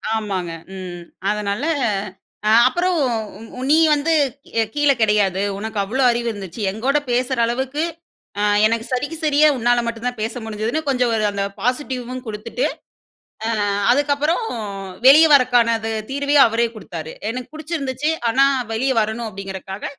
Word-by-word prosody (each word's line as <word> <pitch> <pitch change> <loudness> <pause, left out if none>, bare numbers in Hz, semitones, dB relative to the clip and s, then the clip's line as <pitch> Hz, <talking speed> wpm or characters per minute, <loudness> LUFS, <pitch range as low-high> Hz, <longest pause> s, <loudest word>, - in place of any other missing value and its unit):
ஆமாங்க 195 -6 -3 0.3
ம். 175 -2 -7 0.3
அதனால 210 +2 -2 0.9
அ - - +4 0.2
அப்புறம் 350 +6 0 0.6
உ - - -5
நீ 305 - +6 0.2
வந்துக் 290 -3 +1 0.4
கீழே 290 -1 +3
கெடையாது. 205 -4 +2
உனக்கு 215 +1 -4
அவ்ளோ 240 +7 -1
அறிவு 235 0 -2
இருந்துச்சு. 200 -1 -8
எங்கூட 255 +8 0
பேசுற 250 +1 0
அளவுக்கு 265 +5 -2 0.6
அ - - +1 0.2
எனக்கு 225 +1 +1
சரிக்கு 285 +5 -2
சரியா 300 0 +4
உன்னால 240 0 +2
மட்டும் 230 0 -5
தான் 245 -2 -4
பேச 225 +1 -2
முடிஞ்சிதுன்னு 220 +7 -2
கொஞ்சம் 250 -3 +1
ஒரு 215 - 0
அந்த 200 0 -2 0.2
பாசிட்டிவ்வும் 255 0 -2
கொடுத்துட்டு, 220 - -3 0.8
அ - - 0 0.4
அதுக்கப்புறம் 290 - +1 0.6
வெளியே 310 +4 +8
வர்றக்கான 245 -3 +4
த - - -1 0.2
தீர்வையும் 280 0 +4
அவரே 230 +1 +1
கொடுத்தாரு. 165 -6 -7 0.2
எனக்கு 250 +3 -6
புடிச்சிருந்துச்சு 305 -2 -2 0.2
ஆனா 270 +4 +4 0.3
வெளியே 260 +4 0
வரணும் 220 +2 -3
அப்படிங்கிறக்காக, 195 0 -7
240 Hz, 135 wpm, -20 LUFS, 215-280 Hz, 0.9 s, வெளியே